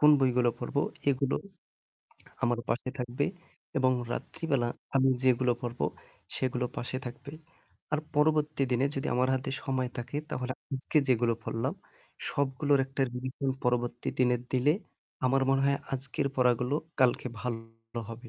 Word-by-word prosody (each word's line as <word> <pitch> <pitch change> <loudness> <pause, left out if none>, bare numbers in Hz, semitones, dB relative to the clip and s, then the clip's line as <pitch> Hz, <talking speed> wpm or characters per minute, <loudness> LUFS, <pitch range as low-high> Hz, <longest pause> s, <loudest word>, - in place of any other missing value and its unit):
কোন 150 - +8
বইগুলা 125 -2 +4
পড়বো 140 - -1 0.3
এগুলো 135 0 +1 1.1
আমার 120 0 +2
পাশে 120 +2 0
থাকবে 125 +3 -1 0.5
এবং 130 -1 +4 0.2
রাত্রিবেলা 135 -7 -1 0.3
আমি 135 0 +5
যেগুলো 125 -1 +4
পড়বো 120 0 -2 0.5
সেগুলো 125 -1 +1
পাশে 130 +1 -2
থাকবে। 125 +4 -8 0.6
আর 150 - +3 0.2
পরবর্তী 150 -1 +3
দিনে 125 +2 +3
যদি 135 - -1
আমার 125 +1 +3
হাতে 130 +1 -2
সময় 130 -2 -1
থাকে 120 +4 -4
তাহলে 125 -2 -2 0.2
আজকে 140 +3 +3
যেগুলো 120 -2 +3
পড়লাম 115 0 -2 0.6
সবগুলোর 140 +1 +2
একটা 135 +1 -5
revision 130 +2 -2
পরবর্তী 120 -1 0
দিনের 125 -1 +3
দিলে, 130 +3 +4 0.5
আমার 135 +1 +3
মনে 135 0 +3
হয় 140 0 +3
আজকের 140 +2 0
পড়াগুলো 125 +1 +3 0.3
কালকে 125 0 +4
ভালো 115 -1 -5
হবে। 120 +2 -8
130 Hz, 135 wpm, -30 LUFS, 120-135 Hz, 1.1 s, কোন